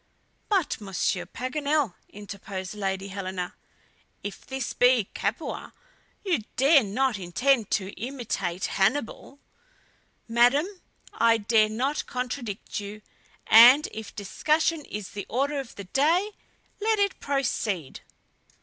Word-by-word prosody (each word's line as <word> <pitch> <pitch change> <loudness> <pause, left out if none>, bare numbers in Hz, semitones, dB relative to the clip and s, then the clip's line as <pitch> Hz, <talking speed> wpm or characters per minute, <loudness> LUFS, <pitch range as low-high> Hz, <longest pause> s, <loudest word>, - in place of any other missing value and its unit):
"But, 335 - +1
Monsieur 190 -2 -1
Paganel," 285 - -1 0.2
interposed 200 -2 -7
Lady 195 -1 -3
Helena, 185 -2 -4 0.7
"if 205 - -6
this 265 -1 -3
be 245 -5 +3
Capua, - - -4 0.5
you 350 -8 +2 0.2
dare 280 +3 +6
not 220 +2 0
intend 225 +6 +1
to 195 -1 -1
imitate 225 -6 -3
Hannibal!" 245 +6 -1 0.9
"Madam, 245 +6 +4 0.5
I 230 0 +4
dare 215 0 +3
not 260 +7 -1
contradict 250 -6 -4
you, 205 +1 -8 0.4
and 245 +7 +8
if 220 -1 -8
discussion 310 +9 0
is 210 -2 -6
the 200 - -6
order 280 +5 0
of 265 -4 -8
the 200 - -7
day, 320 - +2 0.5
let 440 +1 +2
it 400 -1 +1
proceed." 215 - -2
235 Hz, 115 wpm, -26 LUFS, 200-280 Hz, 0.9 s, and